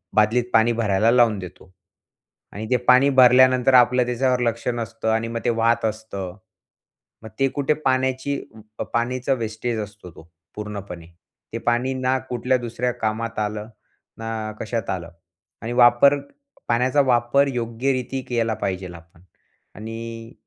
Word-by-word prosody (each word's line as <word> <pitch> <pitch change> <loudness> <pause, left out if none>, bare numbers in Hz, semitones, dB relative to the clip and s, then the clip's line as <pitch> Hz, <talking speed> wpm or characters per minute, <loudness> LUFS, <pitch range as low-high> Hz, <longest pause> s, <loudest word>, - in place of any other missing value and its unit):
बादलीत 110 +3 +3
पाणी 115 +1 +4
भरायला 110 -1 +2
लावून 120 -4 +3
देतो. 90 0 -11 0.8
आणि 105 +3 -6
ते 125 - +4
पाणी 130 +2 +6
भरल्यानंतर 130 0 +6
आपलं 125 0 +5
त्याच्यावर 125 +1 0
लक्ष 115 -1 -2
नसतं 115 -1 -4
आणि 115 +1 0
मग 115 0 -4
ते 120 - +3
वाहत 115 0 +1
असतं. 105 -4 -5 0.9
मग 110 - -9
ते 135 - +3
कुठे 145 +1 +1
पाण्याची 130 +1 0 0.5
पाण्याचा 125 +3 0
वेस्टेज 115 -1 -3
असतो, 105 -3 -8
तो 80 +1 -16 0.3
पूर्णपणे. 100 -5 -7 0.5
ते - - -2
पाणी 120 +2 +1
ना 130 0 0
कुठल्या 125 +1 0
दुसऱ्या 120 +1 -3
कामात 110 +1 -3
आलं, 105 0 -3 0.5
ना 110 -1 -4
कशात 115 -1 -3
आलं. 85 -2 -5 0.5
आणि 115 +1 -4
वापर 120 +3 +5 0.5
पाण्याचा 125 +4 +3
वापर 130 +1 +2
योग्यरीती 125 +2 -2
केला 115 -2 0
पाहिजेल 95 -2 -3
आपण. 85 0 -17 0.5
आणि 115 +1 -8
115 Hz, 135 wpm, -22 LUFS, 110-125 Hz, 0.9 s, पाणी